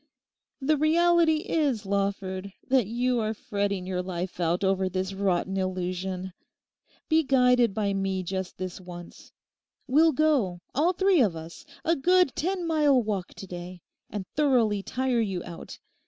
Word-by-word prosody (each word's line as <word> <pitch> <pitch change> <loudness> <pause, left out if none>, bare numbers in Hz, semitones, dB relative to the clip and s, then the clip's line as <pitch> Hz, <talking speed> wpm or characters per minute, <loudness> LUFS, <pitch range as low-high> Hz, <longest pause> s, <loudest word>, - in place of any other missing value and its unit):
'The 300 +3 +2
reality 335 +1 +4
is, 280 - 0
Lawford, 195 -1 -2 0.2
that 255 -6 +3
you 245 +2 0
are 220 0 -1
fretting 200 -2 -2
your 185 -1 -2
life 180 0 -5
out 175 +2 0
over 190 -1 +1
this 185 +1 -3
rotten 190 -1 0
illusion. 185 0 -3 0.7
Be 320 0 +4
guided 250 -6 +3
by 205 -2 0
me 195 -1 -1
just 190 +1 -4
this 185 0 -6
once. 175 -1 -11 0.5
We'll 315 +5 +4
go, 270 - +2 0.2
all 320 +7 +2
three 380 -3 +3
of 200 -8 +2
us, 160 +1 -10 0.2
a 330 - +3
good 360 +1 +3
ten 360 +2 -1
mile 300 -5 +3
walk 200 -4 -3
to - - -8
day, 180 -1 -8 0.3
and 205 -3 -5
thoroughly 245 -9 +2
tire 250 +2 0
you 195 -5 -2
out. 170 -1 -9
200 Hz, 150 wpm, -27 LUFS, 185-275 Hz, 0.7 s, reality